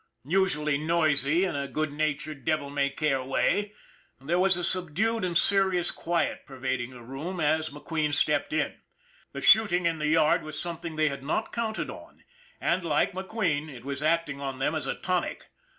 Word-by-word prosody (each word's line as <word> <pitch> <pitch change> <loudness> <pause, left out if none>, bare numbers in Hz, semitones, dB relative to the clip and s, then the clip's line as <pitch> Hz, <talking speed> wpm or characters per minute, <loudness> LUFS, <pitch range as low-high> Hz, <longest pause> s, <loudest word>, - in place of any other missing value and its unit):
Usually 150 -4 +1
noisy 155 +1 +2
in 180 - -2
a 140 0 -2
good 155 +2 -2
natured, 155 -1 -2
devil 155 -3 -1
may 140 -1 +1
care 140 -2 0
way, 200 +10 0 0.5
there 160 +7 0
was 190 -1 +3
a 175 - -3
subdued 185 +6 -1
and 175 -2 +1
serious 190 -3 +3
quiet 170 0 -1
pervading 130 -2 -3
the 125 -2 -12
room 150 +9 -5
as 155 0 +1
McQueen 150 +1 -2
stepped 145 - +1
in. - - -1 0.5
The - - -5
shooting 185 -5 +5
in 165 -1 +1
the 150 - 0
yard 155 0 +4
was 155 0 -6
something 170 -1 -3
they 155 -1 +2
had 140 -1 -6
not 155 +10 -2
counted 225 -2 -2
on - - -13 0.4
and, 175 +1 +1
like 155 +1 +1
McQueen, 185 -6 -2
it 125 -3 -11
was 140 0 -4
acting 155 -2 0
on 135 -1 -4
them 135 +3 0
as 155 - -2
a - - -1
tonic. 180 -1 -2
155 Hz, 180 wpm, -27 LUFS, 145-175 Hz, 0.5 s, shooting